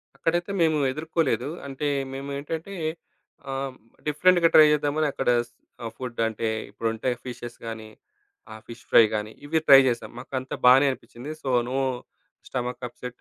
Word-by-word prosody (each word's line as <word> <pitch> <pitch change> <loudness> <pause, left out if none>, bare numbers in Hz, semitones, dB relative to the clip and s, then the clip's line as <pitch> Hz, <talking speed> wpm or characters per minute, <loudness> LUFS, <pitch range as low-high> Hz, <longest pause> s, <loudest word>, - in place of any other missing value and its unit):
అక్కడైతే 175 +3 -1
మేము 160 -2 +3
ఎదుర్కోలేదు. 150 -4 -1 0.2
అంటే 140 +2 -3 0.3
మేము 135 +1 -6
ఏంటంటే, 160 +6 -5 0.8
ఆహ్, 135 0 -3 0.3
డిఫరెంట్‌గా 170 +3 +4
ట్రై 155 -1 +9
చేద్దామని 150 +1 +1
అక్కడ‌స్ 120 -3 0 0.3
ఆ - - -3
ఫుడ్డంటే, 115 -3 -2 0.2
ఇప్పుడుంటాయి 115 +3 -2
ఫిషెస్ 120 -1 -7
గాని, 110 -1 -7 0.6
ఆ - - -9
ఫిష్ 115 0 -11
ఫ్రై 115 - +8
గాని, 105 +1 -3 0.2
ఇవి 160 +1 +2
ట్రై 135 -1 +10
చేసాం. 120 - -4
మాకంతా 130 0 -5
బానే 135 +3 +7
అనిపించింది. 125 +3 -9
So 135 - -2 0.2
no 135 - 0 0.7
stomach 125 0 -4
upset 125 +1 -10
130 Hz, 135 wpm, -25 LUFS, 120-150 Hz, 0.8 s, ట్రై